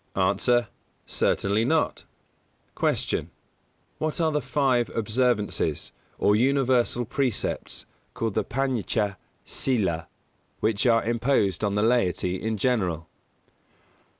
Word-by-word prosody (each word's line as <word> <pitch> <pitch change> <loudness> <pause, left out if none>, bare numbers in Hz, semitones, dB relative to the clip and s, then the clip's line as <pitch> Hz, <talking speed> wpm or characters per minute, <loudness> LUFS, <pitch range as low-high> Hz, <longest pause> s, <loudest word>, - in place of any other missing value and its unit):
_ 95 +3 +1
A. 120 -2 +3 0.4
Certainly 100 +3 +1
not. 160 +6 0 0.7
153. - - +1
Q. - - -11 0.7
_What 155 +1 -1
are 160 -2 +2
the 150 -1 0
five 130 -2 +1
observances, 110 - 0 0.3
or 105 - +3
universal 125 -1 +2
precepts, 125 0 -2 0.3
called 115 -2 -1
the - - +1
Pañcha 115 -6 -1 0.3
Sīla, 95 -11 -1 0.5
which 110 +2 +1
are 115 -1 +4
imposed 115 -5 +1
on 100 -1 +1
the 105 - +2
laity 95 -6 +1
in 110 0 -1
general? 95 -9 0
115 Hz, 110 wpm, -26 LUFS, 100-130 Hz, 0.7 s, are